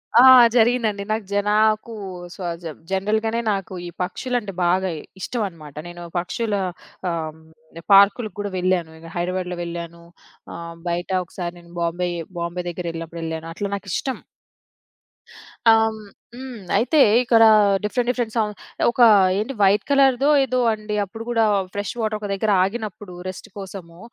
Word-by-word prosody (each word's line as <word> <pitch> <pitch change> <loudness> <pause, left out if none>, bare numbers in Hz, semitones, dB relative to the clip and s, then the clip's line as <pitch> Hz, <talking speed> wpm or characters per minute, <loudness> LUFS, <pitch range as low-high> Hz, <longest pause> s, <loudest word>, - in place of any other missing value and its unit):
ఆ! 240 - +9 0.3
జరిగిందండి. 225 -3 +2
నాకు 215 -1 -1
జనా 205 +1 +1
నాకు 215 +2 -1 0.4
సజ 175 -2 -5 0.3
జనరల్‌గానే 220 +4 0
నాకు 195 -2 -3
ఈ - - -6
పక్షులంటే 220 +2 -3
బాగా 185 +2 +2 0.3
ఇష్టం 235 +5 -3
అన్నమాట. 155 -6 -12
నేను 175 0 -9 0.2
పక్షుల 210 +5 -3 0.6
ఆహ్, 160 -2 -3
హ్మ్. 160 +1 -16
పార్కులకి 200 +1 +5
గూడా 205 -1 -3
వెళ్ళాను. 180 -3 0
ఇంగ 165 0 -11
హైదరాబాద్‌లో 180 0 -2
వెళ్ళాను. 170 0 -7 0.5
ఆహ్, 170 0 -8
బయట 175 +1 -2 0.2
ఒకసారి 175 0 -6
నేను 170 0 -17
బాంబే 175 +1 -1 0.3
బాంబే 170 +1 -3
దగ్గర 175 +1 -6
వెళ్ళినప్పుడు 165 0 -7
వెళ్ళాను. 160 0 -4
అట్లా 200 +3 -4
నాకిష్టం. 200 +7 -3 1.5
ఆహ్. - - +7 0.2
హ్మ్. 215 -1 -11 0.3
హ్మ్. 255 -2 -8 0.2
అయితే 295 +7 +2 0.2
ఇక్కడ 230 -2 +5 0.4
డిఫరెంట్ 240 +3 0
డిఫరెంట్ 240 -3 -1
సౌ 225 - +3 0.5
ఒక 245 - -1 0.4
ఏంటి 220 +7 -2
వైట్ 200 +2 +4
కలర్‌దో 275 0 +4
ఏదో 255 -1 0
అండి 215 -1 -5
అప్పుడు 225 +3 -8
గూడా 230 -2 +3 0.3
ఫ్రెష్ 205 -1 -3
వాటర్ 215 -1 -1
ఒక 210 - -5
దగ్గర 210 +2 0
ఆగినప్పుడు 210 -1 -5
రెస్ట్ 185 +3 -7
కోసము, 185 -4 -9
195 Hz, 140 wpm, -22 LUFS, 175-225 Hz, 1.5 s, ఆ